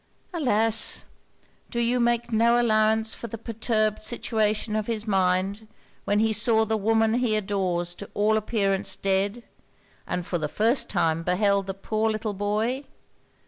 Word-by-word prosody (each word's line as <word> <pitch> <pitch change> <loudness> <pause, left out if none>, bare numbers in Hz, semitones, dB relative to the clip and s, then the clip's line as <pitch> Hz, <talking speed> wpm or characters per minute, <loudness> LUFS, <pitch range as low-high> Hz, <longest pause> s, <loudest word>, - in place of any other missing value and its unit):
'Alas! 225 -8 +1 0.6
do 235 - -3
you 240 +1 +1
make 240 0 +1
no 235 +2 +4
allowance 220 -1 +2
for 235 - -7
the 230 - -7
perturbed 215 -1 -1
situation 215 -1 0
of 215 -1 -1
his 225 -2 -2
mind, 195 +1 0 0.4
when 205 - +1
he 220 +1 +2
saw 220 +1 +3
the 220 +1 0
woman 220 +1 +2
he 235 -4 +1
adores 185 -4 -1
to 200 +3 -9
all 210 +1 +2
appearance 205 -3 0
dead, 200 +4 0 0.6
and 180 -1 -3
for 175 - -2
the 155 - -1
first 230 - +1
time 165 -4 +1
beheld 195 +3 +1
the 195 - -4
poor 215 +3 -1
little 215 -1 -2
boy? 210 +6 -1
215 Hz, 150 wpm, -25 LUFS, 200-225 Hz, 0.6 s, no